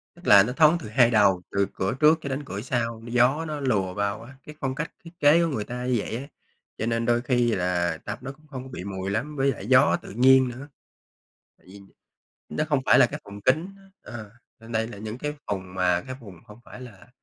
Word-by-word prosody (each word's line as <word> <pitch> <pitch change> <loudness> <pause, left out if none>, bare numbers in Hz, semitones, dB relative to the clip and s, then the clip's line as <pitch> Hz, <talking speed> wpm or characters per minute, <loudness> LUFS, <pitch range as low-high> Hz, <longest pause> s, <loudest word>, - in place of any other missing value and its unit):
tức 175 - -17
là 100 -1 +8
nó 125 - -3
thoáng 155 +4 +5
từ 110 - -8
hai 120 +2 +4
đầu, 100 -4 +4
từ 100 -1 +1
cửa 95 - -2
trước 155 +1 +5
cho 140 - -5
đến 135 +2 -3
cửa 100 -5 -5
sau, 115 -2 -2
gió 125 +7 +2
nó 155 -2 -4
lùa 105 -9 0
vào 100 +2 -2
á, 130 +4 -13
cái 150 - -11
phong 135 -2 -2
cách 150 +3 -4
thiết 165 - -12
kế 150 +3 +5
của 170 - +1
người 125 -9 -2
ta 125 +3 -6
như 125 - +1
vậy 105 - -4
á, 130 - -6 0.5
cho 110 - -2
nên 115 0 -1
đôi 120 0 +2
khi 120 -1 +1
là 90 -2 0
tập - - -5
nó 135 +1 -6
cũng 155 +2 -20
không 130 -3 -7
có 130 - -11
bị 125 - -7
mùi 95 0 -5
lắm 150 +8 -3
với 135 0 +2
lại 100 -5 -8
gió 130 +3 +5
tự - - -11
nhiên 130 +3 +5
nữa. 130 +4 -9 0.9
Tại - - -28
vì, 100 +2 -13 0.7
nó 155 - -2
không 145 -3 +2
phải - - +6
là - - +7
cái - - -7
phòng 100 0 -10
kín 155 - +1
á, - - -20 0.2
ờ, 110 -4 -9 0.3
nên 115 +1 -11
đây 110 0 0
là 105 -4 -10
những 110 +3 -6
cái 150 +2 -4 0.2
vùng 95 -2 -4
mà 90 -1 +2
cái 130 - -5
vùng 95 -7 -13
hông 115 +1 -15
phải - - -12
là, 120 -2 -13
120 Hz, 250 wpm, -25 LUFS, 100-135 Hz, 0.9 s, là